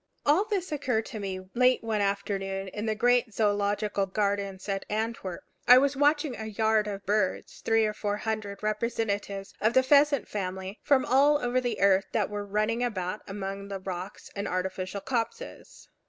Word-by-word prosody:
All 310 Hz, +8 st, +4 dB
this 390 Hz, -5 st, -2 dB
occurred 255 Hz, -7 st, 0 dB
to 220 Hz, -, -5 dB
me 185 Hz, -2 st, -5 dB
late 250 Hz, 0 st, +3 dB
one 220 Hz, -2 st, 0 dB
afternoon 195 Hz, -1 st, -2 dB
in 210 Hz, +3 st, -5 dB
the 215 Hz, -, 0 dB
great 245 Hz, 0 st, +2 dB
Zoological 205 Hz, -1 st, +1 dB
Gardens 200 Hz, -1 st, -2 dB
at 195 Hz, -1 st, -2 dB
Antwerp. 215 Hz, -4 st, -3 dB, 0.2 s
I 250 Hz, -, +10 dB
was 275 Hz, +1 st, +3 dB
watching 290 Hz, -1 st, +2 dB
a 220 Hz, -, -6 dB
yard 220 Hz, 0 st, +1 dB
of 200 Hz, -1 st, -5 dB
birds 205 Hz, -2 st, -1 dB
three 225 Hz, -1 st, +3 dB
or 215 Hz, -, -1 dB
four 205 Hz, -1 st, -2 dB
hundred 215 Hz, -2 st, -4 dB
representatives 210 Hz, -2 st, -2 dB
of 220 Hz, +4 st, +2 dB
the 260 Hz, -, +6 dB
pheasant 285 Hz, +1 st, +4 dB
family 190 Hz, 0 st, -4 dB
from 270 Hz, -2 st, +3 dB
all 280 Hz, +4 st, +5 dB
over 250 Hz, -1 st, 0 dB
the 245 Hz, -1 st, -2 dB
earth 195 Hz, 0 st, +4 dB
that 210 Hz, -2 st, 0 dB
were 205 Hz, 0 st, -4 dB
running 215 Hz, +4 st, 0 dB
about 190 Hz, -4 st, -2 dB
among 195 Hz, 0 st, -5 dB
the 195 Hz, -1 st, -5 dB
rocks 185 Hz, +1 st, -7 dB
and 200 Hz, -, -3 dB
artificial 185 Hz, +1 st, -3 dB
copses. 255 Hz, -, -4 dB
210 Hz, 170 wpm, -28 LUFS, 195-245 Hz, 0.2 s, I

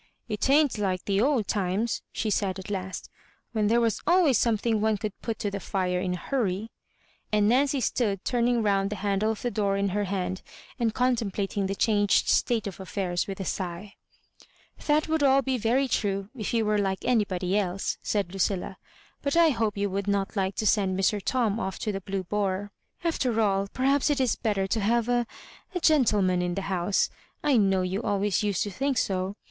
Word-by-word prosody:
*' -, -, -49 dB
It 215 Hz, +3 st, -1 dB
ain't 285 Hz, -5 st, +4 dB
like 185 Hz, -3 st, -1 dB
the 200 Hz, 0 st, +1 dB
old 255 Hz, -5 st, +2 dB
times," 200 Hz, +3 st, -1 dB
she 220 Hz, -, -2 dB
said 195 Hz, -2 st, 0 dB
at 190 Hz, +2 st, -7 dB
last, 190 Hz, -1 st, -4 dB, 0.2 s
" -, -, -39 dB
when 215 Hz, -2 st, +1 dB
there 230 Hz, +3 st, +3 dB
was 230 Hz, -3 st, 0 dB
always 345 Hz, -7 st, +4 dB
something 225 Hz, -1 st, +1 dB
as -, -, -2 dB
one 220 Hz, -1 st, +2 dB
could 210 Hz, 0 st, -4 dB
put 225 Hz, -2 st, -3 dB
to 205 Hz, -, -2 dB
the 200 Hz, -, -3 dB
fire 180 Hz, -2 st, -1 dB
in 180 Hz, 0 st, -1 dB
a -, -, -5 dB
hurry 220 Hz, -3 st, -2 dB, 0.3 s
;" -, -, -37 dB
and 210 Hz, -1 st, +3 dB
Naor 260 Hz, +6 st, +4 dB
cy 280 Hz, -, 0 dB
stood 205 Hz, -4 st, -1 dB
turning 240 Hz, -1 st, +1 dB
round 200 Hz, -1 st, +2 dB
the 210 Hz, -, -3 dB
handle 200 Hz, +1 st, 0 dB
of 220 Hz, -, -3 dB
the 245 Hz, -, -1 dB
door 200 Hz, -3 st, 0 dB
in 200 Hz, 0 st, +1 dB
her 205 Hz, +2 st, -1 dB
hand, 185 Hz, -1 st, -3 dB, 0.4 s
and 225 Hz, -2 st, 0 dB
contemplating 210 Hz, -5 st, 0 dB
the 195 Hz, -, -2 dB
changed 205 Hz, -1 st, +2 dB
state 230 Hz, -3 st, +2 dB
of 195 Hz, -3 st, -5 dB
aSairs 185 Hz, -2 st, -2 dB
with 195 Hz, -1 st, -6 dB
a 190 Hz, -, -3 dB
sigh. 185 Hz, +3 st, -4 dB, 0.9 s
"That 300 Hz, +1 st, +3 dB
would 320 Hz, 0 st, +1 dB
be -, -, +4 dB
all 270 Hz, +1 st, +4 dB
very 255 Hz, +1 st, +1 dB
true, 200 Hz, -4 st, -1 dB
if 215 Hz, -5 st, -3 dB
you 230 Hz, -2 st, +1 dB
were 210 Hz, 0 st, +2 dB
like 190 Hz, -2 st, -1 dB
anybody 195 Hz, -6 st, +1 dB
else," 195 Hz, -2 st, -1 dB
saidLudlla; 195 Hz, -1 st, -1 dB, 0.4 s
"but 280 Hz, +3 st, 0 dB
I 335 Hz, -1 st, +6 dB
hope 225 Hz, -6 st, -1 dB
you 200 Hz, 0 st, +1 dB
would 200 Hz, +1 st, -2 dB
not 200 Hz, +1 st, 0 dB
like 195 Hz, -1 st, -1 dB
to 215 Hz, -, -2 dB
send 190 Hz, -2 st, +2 dB
Mr. 205 Hz, +2 st, +1 dB
Tom 230 Hz, -4 st, 0 dB
off 190 Hz, -2 st, -3 dB
to 215 Hz, -, -2 dB
the 195 Hz, -1 st, -4 dB
Blue 195 Hz, 0 st, -3 dB
Boar. 200 Hz, +1 st, -2 dB, 0.3 s
After 255 Hz, -9 st, 0 dB
all, 200 Hz, -2 st, +2 dB
perhaps 270 Hz, +6 st, +1 dB
it 290 Hz, -1 st, +1 dB
is 255 Hz, -3 st, +2 dB
better 205 Hz, -4 st, 0 dB
to 205 Hz, +4 st, -1 dB
have 230 Hz, +3 st, +1 dB
a 240 Hz, -1 st, +1 dB, 0.2 s
— -, -, -24 dB
a -, -, +1 dB
gentleman 210 Hz, -, +3 dB
in 175 Hz, 0 st, -1 dB
the 195 Hz, -, -3 dB
house. 180 Hz, +2 st, +1 dB, 0.3 s
I 290 Hz, -4 st, +3 dB
know 195 Hz, -3 st, +3 dB
you 185 Hz, +3 st, -2 dB
always 205 Hz, -3 st, 0 dB
used 205 Hz, -3 st, 0 dB
to 205 Hz, -, -5 dB
think 270 Hz, +6 st, -1 dB
so. 190 Hz, -1 st, -1 dB
205 Hz, 210 wpm, -27 LUFS, 195-235 Hz, 0.9 s, I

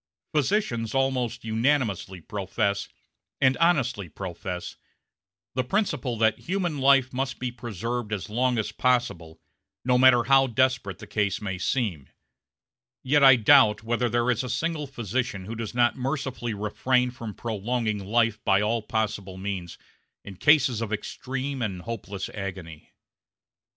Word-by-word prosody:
Physicians 140 Hz, -, 0 dB
almost 125 Hz, -3 st, 0 dB
unanimously 110 Hz, -6 st, 0 dB
profess, 100 Hz, +2 st, -2 dB, 0.5 s
and 130 Hz, 0 st, +4 dB
honestly 130 Hz, -, +1 dB
profess, 90 Hz, +1 st, -6 dB, 0.8 s
the 130 Hz, -, 0 dB
principle 140 Hz, -, -1 dB
that 110 Hz, -1 st, +2 dB
human 175 Hz, -5 st, -2 dB
life 135 Hz, -1 st, +4 dB
must 130 Hz, 0 st, -2 dB
be 125 Hz, -1 st, -3 dB
preserved 120 Hz, 0 st, -4 dB
as 105 Hz, -3 st, -3 dB
long 125 Hz, +3 st, +1 dB
as 110 Hz, -1 st, -1 dB
possible, 100 Hz, -10 st, 0 dB, 0.5 s
no 125 Hz, -1 st, +3 dB
matter 125 Hz, -2 st, +6 dB
how 135 Hz, +1 st, +5 dB
desperate 120 Hz, -6 st, 0 dB
the -, -, -10 dB
case 100 Hz, -3 st, -1 dB
may 95 Hz, -3 st, -4 dB
seem; 90 Hz, -, -1 dB, 0.9 s
yet 145 Hz, +2 st, +3 dB
I 135 Hz, -1 st, +9 dB
doubt 115 Hz, -3 st, +5 dB
whether 120 Hz, +2 st, 0 dB
there 120 Hz, +2 st, +2 dB
is 120 Hz, +1 st, -1 dB
a 125 Hz, -, -5 dB
single 150 Hz, +4 st, -2 dB
physician 120 Hz, -5 st, -3 dB
who 110 Hz, -, -6 dB
does 115 Hz, 0 st, -5 dB
not 120 Hz, -1 st, +3 dB
mercifully 130 Hz, -4 st, -3 dB
refrain 125 Hz, +5 st, +1 dB
from 115 Hz, -4 st, -8 dB
prolonging 110 Hz, -1 st, -2 dB
life 110 Hz, +1 st, +1 dB
by 95 Hz, -1 st, +4 dB
all 110 Hz, +2 st, 0 dB
possible 105 Hz, -4 st, -3 dB
means 95 Hz, -3 st, -5 dB, 0.5 s
in 100 Hz, -, -9 dB
cases 135 Hz, -, +4 dB
of 110 Hz, -2 st, -3 dB
extreme 130 Hz, +5 st, -4 dB
and 95 Hz, -6 st, -3 dB
hopeless 100 Hz, -4 st, -5 dB
agony. 95 Hz, -6 st, -7 dB
120 Hz, 140 wpm, -26 LUFS, 105-130 Hz, 0.9 s, I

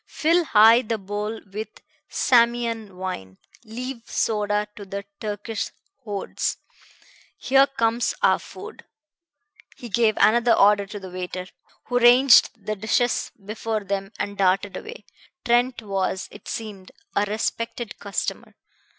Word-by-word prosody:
Fill 335 Hz, +2 st, +2 dB
high 225 Hz, -1 st, +7 dB
the 225 Hz, -2 st, -2 dB
bowl 210 Hz, +2 st, -4 dB
with 215 Hz, +2 st, -4 dB, 0.4 s
Samian 235 Hz, -4 st, +2 dB
wine; 95 Hz, -, -6 dB, 0.3 s
leave 245 Hz, +3 st, -6 dB
soda 210 Hz, -1 st, 0 dB
to 205 Hz, -, -9 dB
the 200 Hz, +1 st, -6 dB
Turkish 210 Hz, +1 st, -4 dB, 0.3 s
hordes. 205 Hz, -3 st, -3 dB, 0.8 s
Here 270 Hz, +1 st, +4 dB
comes 230 Hz, -3 st, 0 dB
our -, -, +4 dB
food." -, -, -11 dB, 0.9 s
He 240 Hz, -, -9 dB
gave 220 Hz, 0 st, +2 dB
another 235 Hz, +1 st, +4 dB
order 200 Hz, 0 st, +4 dB
to 210 Hz, +1 st, -7 dB
the 190 Hz, -2 st, -9 dB
waiter, 180 Hz, 0 st, -5 dB, 0.4 s
who 245 Hz, 0 st, +1 dB
ranged 240 Hz, -3 st, +6 dB
the 215 Hz, -, -2 dB
dishes 220 Hz, +4 st, 0 dB
before 215 Hz, 0 st, -3 dB
them 195 Hz, 0 st, -3 dB
and 200 Hz, 0 st, -4 dB
darted 195 Hz, +1 st, +2 dB
away. 465 Hz, -, -9 dB, 0.4 s
Trent 240 Hz, 0 st, +2 dB
was, 195 Hz, -2 st, -2 dB
it 205 Hz, -, -13 dB
seemed, 205 Hz, -4 st, -6 dB, 0.2 s
a -, -, +3 dB
respected 225 Hz, +2 st, -3 dB
customer. 200 Hz, -1 st, -4 dB
215 Hz, 125 wpm, -24 LUFS, 200-235 Hz, 0.9 s, high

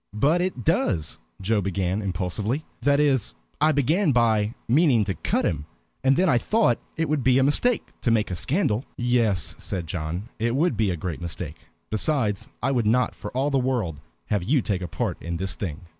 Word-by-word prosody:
"But 150 Hz, +10 st, +3 dB
it 180 Hz, -10 st, -2 dB
does" 80 Hz, -6 st, 0 dB, 0.2 s
Joe 105 Hz, +2 st, +1 dB
began, 95 Hz, +1 st, -1 dB
impulsively. 100 Hz, -, -2 dB, 0.2 s
"That 140 Hz, +3 st, +3 dB
is, 130 Hz, -, +2 dB, 0.3 s
I 155 Hz, +1 st, +5 dB
began 155 Hz, +5 st, +2 dB
by 110 Hz, -2 st, +2 dB
meaning 130 Hz, -3 st, +4 dB
to 95 Hz, -, -1 dB
cut -, -, -1 dB
him, 75 Hz, -2 st, -2 dB, 0.4 s
and 135 Hz, +1 st, +4 dB
then 185 Hz, -, +3 dB
I 125 Hz, -8 st, +4 dB
thought 210 Hz, -, +2 dB, 0.2 s
it 165 Hz, 0 st, 0 dB
would 150 Hz, -3 st, 0 dB
be 130 Hz, 0 st, +4 dB
a 135 Hz, -, +4 dB
mistake 215 Hz, -, +1 dB
to -, -, +1 dB
make 110 Hz, -3 st, +2 dB
a -, -, -1 dB
scandal." 125 Hz, -, +1 dB
"Yes," 120 Hz, -8 st, +1 dB
said 90 Hz, -3 st, -4 dB
John, 85 Hz, +5 st, -4 dB
"it 115 Hz, +2 st, 0 dB
would 165 Hz, +5 st, +2 dB
be 110 Hz, -3 st, +1 dB
a 90 Hz, -, -1 dB
great 85 Hz, +1 st, -4 dB
mistake. 85 Hz, -1 st, -6 dB, 0.2 s
Besides, 110 Hz, -3 st, 0 dB, 0.2 s
I 135 Hz, -, +2 dB
would 120 Hz, -5 st, +1 dB
not 125 Hz, +2 st, +2 dB
for 105 Hz, -, -7 dB
all 140 Hz, +2 st, +1 dB
the 135 Hz, -, +3 dB
world 120 Hz, -, -1 dB, 0.3 s
have 105 Hz, -4 st, +1 dB
you 130 Hz, +5 st, +2 dB
take 95 Hz, -3 st, -1 dB
a 90 Hz, -, -3 dB
part -, -, -3 dB
in 85 Hz, 0 st, -3 dB
this 95 Hz, +2 st, -1 dB
thing. 90 Hz, -3 st, -5 dB
115 Hz, 200 wpm, -25 LUFS, 95-135 Hz, 0.4 s, I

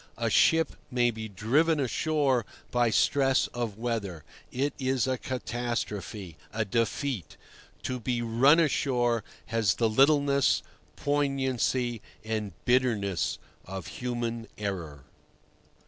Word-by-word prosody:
A -, -, 0 dB
ship 165 Hz, 0 st, +4 dB
may 120 Hz, -1 st, +2 dB
be 110 Hz, -1 st, -6 dB
"driven 145 Hz, -, +2 dB
ashore" 140 Hz, -1 st, +1 dB, 0.3 s
by 120 Hz, -1 st, +3 dB
stress 135 Hz, +4 st, +3 dB
of 115 Hz, -4 st, -3 dB
weather. 110 Hz, -9 st, -3 dB, 0.3 s
It 140 Hz, +3 st, -1 dB
is 130 Hz, -2 st, +1 dB
a 130 Hz, -1 st, -1 dB
catastrophe, 115 Hz, -, -4 dB
a 110 Hz, 0 st, -1 dB
defeat. 115 Hz, -, -2 dB, 0.5 s
To 130 Hz, -1 st, -2 dB
be 120 Hz, 0 st, -1 dB
"run 130 Hz, +8 st, +5 dB
ashore" 125 Hz, -7 st, +1 dB, 0.3 s
has 115 Hz, -5 st, +2 dB
the 115 Hz, -, +2 dB
littleness, 140 Hz, +3 st, +4 dB, 0.3 s
poignancy, 130 Hz, -4 st, 0 dB, 0.2 s
and 110 Hz, -3 st, -3 dB
bitterness 115 Hz, -8 st, +1 dB, 0.3 s
of 95 Hz, -1 st, -6 dB, 0.2 s
human 120 Hz, -2 st, -3 dB
error. 85 Hz, -9 st, -4 dB
120 Hz, 110 wpm, -28 LUFS, 110-135 Hz, 0.5 s, run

